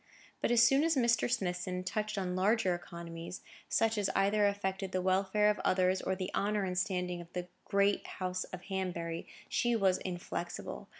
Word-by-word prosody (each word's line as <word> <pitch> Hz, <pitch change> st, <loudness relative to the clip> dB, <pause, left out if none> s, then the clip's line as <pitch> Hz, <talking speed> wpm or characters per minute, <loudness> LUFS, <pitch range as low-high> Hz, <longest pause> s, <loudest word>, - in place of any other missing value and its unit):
But -, -, +1 dB
as 235 Hz, -1 st, +6 dB
soon 270 Hz, +5 st, +5 dB
as 325 Hz, -1 st, +3 dB
Mr. 235 Hz, -3 st, +3 dB
Smithson 180 Hz, -5 st, -1 dB
touched 215 Hz, +3 st, -2 dB
on 180 Hz, -2 st, -1 dB
larger 195 Hz, 0 st, +3 dB
economies, 170 Hz, 0 st, -7 dB, 0.3 s
such 225 Hz, -1 st, +2 dB
as 200 Hz, -, +1 dB
either 205 Hz, +1 st, +4 dB
affected 190 Hz, -1 st, -2 dB
the 185 Hz, -, +1 dB
welfare 190 Hz, +3 st, +2 dB
of 210 Hz, 0 st, +2 dB
others, 185 Hz, 0 st, +2 dB
or 190 Hz, -, -1 dB
the 185 Hz, 0 st, -4 dB
honour 210 Hz, 0 st, +1 dB
and 185 Hz, -1 st, -2 dB
standing 180 Hz, -2 st, -1 dB
of 170 Hz, 0 st, -13 dB
the 180 Hz, 0 st, -4 dB, 0.2 s
great 200 Hz, 0 st, +2 dB
House 185 Hz, 0 st, -3 dB
of 180 Hz, -1 st, -9 dB
Hanbury, 175 Hz, -4 st, -3 dB, 0.2 s
she 240 Hz, -1 st, +1 dB
was 195 Hz, -4 st, +3 dB
inflexible. 175 Hz, -1 st, -5 dB
190 Hz, 175 wpm, -33 LUFS, 180-210 Hz, 0.3 s, as